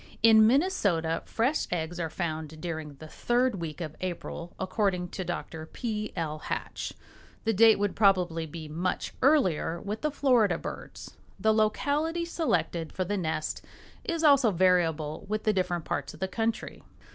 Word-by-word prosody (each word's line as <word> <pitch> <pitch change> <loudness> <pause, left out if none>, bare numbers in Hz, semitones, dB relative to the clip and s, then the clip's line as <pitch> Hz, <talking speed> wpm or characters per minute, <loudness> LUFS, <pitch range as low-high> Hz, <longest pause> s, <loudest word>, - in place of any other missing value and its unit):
In 220 -1 +8
Minnesota 205 - +2
fresh 255 +7 0
eggs 175 0 -3
are 165 -2 -1
found 155 -2 -4
during 160 -3 -5
the 155 +3 -11
third 240 +2 0
week 155 -1 -5
of 155 -2 -5
April, 175 -1 -5
according 185 -2 0
to 185 - -4
Dr. 160 -2 -5
P. 215 -1 -4
L. 155 -3 -3
Hatch. - - -4 0.5
The 225 - +1
date 225 +2 +6
would 205 -1 -1
probably 180 -5 +3
be 155 0 -8
much 170 +5 -2
earlier 185 - +3
with 210 +4 -5
the 305 - +1
Florida 245 - +3
birds. - - -8 0.2
The 220 +3 +3
locality 290 +10 +1
selected 180 - -1
for 185 - -2
the 205 +3 -1
nest 160 -4 -2 0.4
is 335 -1 -2
also 280 -6 +6
variable 165 -5 +2
with 215 0 -1
the 215 - +2
different 180 -3 -1
parts 145 +1 -3
of - - -16
the 190 - -1
country. 225 +3 -2
185 Hz, 155 wpm, -28 LUFS, 165-225 Hz, 0.5 s, In